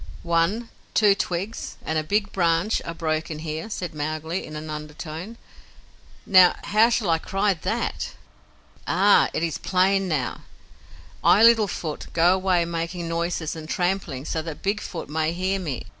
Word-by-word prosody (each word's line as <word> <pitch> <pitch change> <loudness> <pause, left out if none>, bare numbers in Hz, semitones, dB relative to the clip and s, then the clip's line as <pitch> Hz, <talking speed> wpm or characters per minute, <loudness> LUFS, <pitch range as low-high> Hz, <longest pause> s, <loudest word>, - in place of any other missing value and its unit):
"One, 170 +8 +1 0.3
two 210 -2 +6
twigs 195 +3 -4
and 160 - -2
a - - -2
big 205 +5 0
branch 170 +3 +1
are 165 - -4
broken 160 -1 -2
here," 155 +5 -5
said 180 -6 -4
Mowgli, 155 +3 -3
in 155 - -9
an 155 +1 -6
undertone. 155 +7 -7 0.9
"Now, 185 -3 +7
how 220 +3 +4
shall 230 -7 +1
I 165 - +2
cry 195 +4 +1
THAT? 165 - -3 0.7
Ah! - - +4
It - - -2
is 160 -3 -2
plain 190 +1 +2
now. 145 -8 -2 0.8
I, 215 - +6
Little 230 -2 +6
Foot, 155 -5 -5
go 170 +2 +5
away 185 -2 +2
making 170 +1 -3
noises 170 -1 -2
and 155 -1 -8
tramplings 175 -7 -1
so 160 - -1
that 160 -2 -8
Big 205 +2 0
Foot 170 - -6
may 155 +2 -1
hear 190 +2 -1
me." 150 -9 -4
170 Hz, 160 wpm, -24 LUFS, 160-195 Hz, 0.9 s, Now